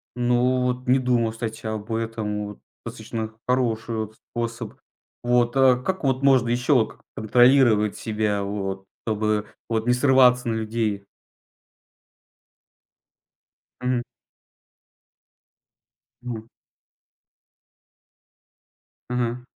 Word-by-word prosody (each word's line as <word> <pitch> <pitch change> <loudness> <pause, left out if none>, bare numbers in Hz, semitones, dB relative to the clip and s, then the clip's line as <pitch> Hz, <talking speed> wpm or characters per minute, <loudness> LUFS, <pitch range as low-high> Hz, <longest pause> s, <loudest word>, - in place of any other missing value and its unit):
Ну, 125 +1 +2
вот 125 0 -2
не 130 +2 +4
думал, 120 -3 +1
кстати, 115 0 -6
об 110 0 -4
этом. 110 -2 -3
Вот 105 - -10 0.3
достаточно 110 -1 -5
хороший, 115 -3 0
вот, 110 -1 -4
способ. 115 -1 -5 0.5
Вот, 120 0 +2
а 130 -2 +5
как, 185 +9 -3
вот, 130 -1 +1
можно 130 -4 +4
ещё, 125 +4 +2
вот 115 -4 +2
к - - -29
контролировать 120 -2 +4
себя, 105 -2 -1
вот 95 -1 -4 0.2
чтобы, 110 -1 0 0.2
вот 115 0 -1
не 125 - +4
срываться 125 -2 +4
на 115 - 0
людей? 110 -2 -2 2.8
Мгм. 125 -1 0 2.2
Мгм. 115 -3 -6 2.6
Ага. 125 0 -2
115 Hz, 100 wpm, -24 LUFS, 110-125 Hz, 2.8 s, а